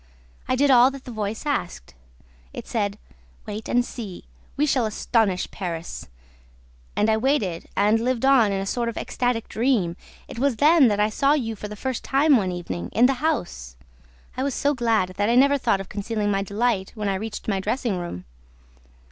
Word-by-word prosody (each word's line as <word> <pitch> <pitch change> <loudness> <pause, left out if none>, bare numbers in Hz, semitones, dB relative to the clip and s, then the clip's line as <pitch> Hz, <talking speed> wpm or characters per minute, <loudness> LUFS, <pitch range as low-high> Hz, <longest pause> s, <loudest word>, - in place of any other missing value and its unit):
I 255 - +1
did 280 +2 +3
all 250 0 +7
that 275 -1 -10
the 250 - -7
voice 215 +2 -4
asked. 180 - -3 0.6
It - - -7
said, 205 -3 -1 0.5
'Wait 210 +1 -6
and 245 0 +2
see: 210 -9 -8 0.3
we 295 - +3
shall 260 -6 +1
astonish 215 -3 0
Paris!' 170 -3 -5 0.9
And 210 - +2
I 220 0 +3
waited 220 - 0
and 210 +2 +3
lived 250 +1 0
on 255 -6 +5
in 195 - -1
a 195 - -3
sort 235 +4 -1
of 230 - -7
ecstatic 245 -2 -1
dream. 220 -8 0 0.3
It - - -8
was 275 -1 +2
then 300 +2 +5
that 205 -2 +1
I 210 +1 +3
saw 275 +6 +3
you 230 -7 -1
for 210 - -7
the 210 - -8
first 260 +3 -4
time 285 +2 +4
one 190 -6 +1
evening, 95 - -5
in 235 - +5
the 260 0 +1
house. 65 - -3 0.6
I - - -3
was 275 -1 -1
so 285 +1 +1
glad 230 -7 +1
that 205 +2 +1
I 235 - +3
never 280 +2 +5
thought 230 -6 +1
of 195 - -7
concealing 205 0 -2
my 195 0 +1
delight 200 -1 -1
when 210 -2 -3
I 195 - +1
reached 210 +3 -5
my 200 -3 0
dressing 210 -1 -1
room. 170 - -6
225 Hz, 195 wpm, -24 LUFS, 200-255 Hz, 0.9 s, all